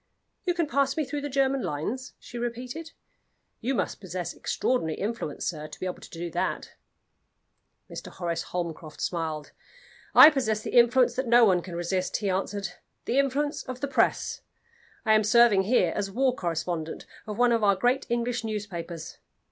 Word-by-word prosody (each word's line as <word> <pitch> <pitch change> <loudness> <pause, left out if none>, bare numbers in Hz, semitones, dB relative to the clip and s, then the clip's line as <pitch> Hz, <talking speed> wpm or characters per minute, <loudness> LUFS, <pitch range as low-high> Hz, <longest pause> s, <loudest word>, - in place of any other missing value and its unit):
"You 355 -2 +1
can 340 -1 +1
pass 280 -2 +1
me 310 - +1
through 290 +2 -4
the 290 - -4
German 270 0 +1
lines?" 225 - -3
she 240 - -9
repeated. 250 +7 -5 0.7
"You 260 +4 -1
must - - -2
possess 180 -2 -4
extraordinary 160 -12 -1
influence, 205 -8 -4
sir, 155 -3 -3
to - - -11
be - - -4
able 180 - -4
to - - -11
do 170 0 -6
that." - - -2 1.1
Mr. - - -8
Horace 170 -2 -3
Holmcroft 165 -3 -5
smiled. 160 -3 -3 0.6
"I 310 - +11
possess 220 -7 0
the - - -4
influence 240 +1 +5
that 260 -1 -1
no 235 0 +7
one 185 -4 +3
can 175 0 -8
resist," 180 +2 -1
he 205 -3 -1
answered 195 0 -2 0.4
"the 255 - +2
influence 285 +2 0
of 255 -1 -6
the 280 - -2
Press. 275 - +1 0.6
I 220 - +5
am 215 0 +5
serving 220 -3 +5
here 245 +5 +3
as 200 -1 -1
war 255 +5 +1
correspondent 165 -2 -3 0.2
of 210 -1 -5
one 245 0 +4
of 230 -2 +2
our 200 -1 +5
great 245 +7 +1
English 240 0 -1
newspapers. 185 -7 -5
220 Hz, 170 wpm, -27 LUFS, 180-255 Hz, 1.1 s, I